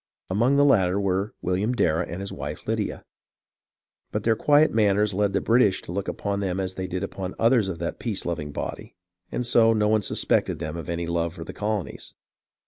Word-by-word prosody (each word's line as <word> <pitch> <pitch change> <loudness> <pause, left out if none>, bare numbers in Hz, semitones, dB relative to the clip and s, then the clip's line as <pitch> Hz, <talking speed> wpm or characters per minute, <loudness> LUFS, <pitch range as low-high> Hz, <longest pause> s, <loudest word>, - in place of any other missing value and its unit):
Among 120 +8 +3
the 145 0 +5
latter 95 -8 +3
were 100 +1 -1
William 95 +6 0
Dar 80 -10 +2
rah 85 - 0
and 85 +3 -6
his 100 - -5
wife - - -6
Lydia; - - -2 1.1
but 105 - -2
their 115 0 +3
quiet 145 +6 +4
manners 105 -1 +3
led 100 0 +1
the - - +1
British 115 -5 +3
to - - -8
look 100 +2 -3
upon 100 -1 -2
them 95 -2 -1
as 95 -1 -2
they 95 0 -4
did 90 +1 -3
upon 95 -1 -5
others 115 -3 +3
of 90 -3 -4
that 85 0 -4
peace 110 -5 -2
loving 75 -4 -3
body, - - -6 0.4
and 125 - -2
so 115 -1 +5
no 105 -1 +2
one 110 0 +3
suspected - - 0
them 75 0 -5
of 85 -2 -6
any 85 0 -2
love 85 0 -1
for - - -7
the - - -8
colonies. 105 -3 -4
100 Hz, 210 wpm, -25 LUFS, 90-110 Hz, 1.1 s, the